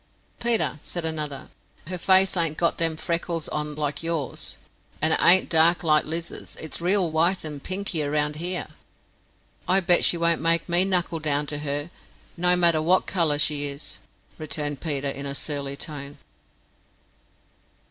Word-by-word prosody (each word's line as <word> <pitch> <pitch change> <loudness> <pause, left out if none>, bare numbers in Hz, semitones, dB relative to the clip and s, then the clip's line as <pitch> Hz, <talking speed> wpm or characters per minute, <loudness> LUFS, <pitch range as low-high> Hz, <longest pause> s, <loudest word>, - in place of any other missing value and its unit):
"Peter," 230 -10 +1
said 175 -2 -5
another, 150 -3 -3 0.4
"her 180 +3 -5
face 190 +1 +4
ain't 165 -3 +1
got 170 - 0
them 165 -1 +1
freckles 170 0 -2
on 150 0 -4
like 150 -1 -3
yours, 165 -5 -4 0.4
and 160 +1 +3
it - - +3
ain't 185 +2 +7
dark 165 +2 +4
like 155 -2 +3
Lizer's. 165 +2 -4
It's 160 +1 -7
reel 180 -1 +2
wite, 170 +4 +2
and 150 -3 -7
pinky 185 -2 -3
round 150 0 -1
here." 175 +2 -3 1.0
"I 190 +1 +4
bet 175 -1 +3
she 175 - +4
won't 170 0 +1
make 165 0 +1
me 175 +1 +3
knuckle 175 -3 0
down 150 -1 0
to 145 0 -4
her, 145 +2 -4 0.4
no 180 +1 +3
matter 170 -3 +4
wot 180 +4 +2
colour 165 -6 0
she 145 0 +1
is," 140 +1 -7 0.4
returned 145 -2 -3
Peter, 145 -4 -2
in 140 0 -4
a 140 - -4
surly 140 -2 -4
tone. 145 -2 -7
160 Hz, 155 wpm, -24 LUFS, 150-175 Hz, 1.0 s, ain't